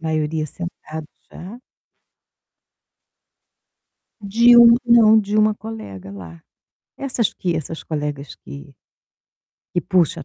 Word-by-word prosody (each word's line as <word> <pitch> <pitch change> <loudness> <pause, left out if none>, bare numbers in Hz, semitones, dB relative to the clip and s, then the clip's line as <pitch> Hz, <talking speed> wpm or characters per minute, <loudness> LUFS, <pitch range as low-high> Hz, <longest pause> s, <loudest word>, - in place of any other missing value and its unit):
a - - -14
maioria 155 0 -2
sentado 160 -1 -9 0.2
já. 210 +8 -11 2.6
De 235 +4 +4
um 235 -1 +8
não, 230 -2 +5
de 205 -1 -3
uma 215 0 +3
colega 205 - -10
lá. 85 -4 -12 0.6
Essas 255 -5 -2
que 175 -3 -3
essas 160 +1 -6
colegas 145 -3 -5
que 70 +1 -13 1.0
que 175 - +1
puxa 180 -2 +2
a 140 - -10
175 Hz, 110 wpm, -20 LUFS, 150-220 Hz, 2.6 s, um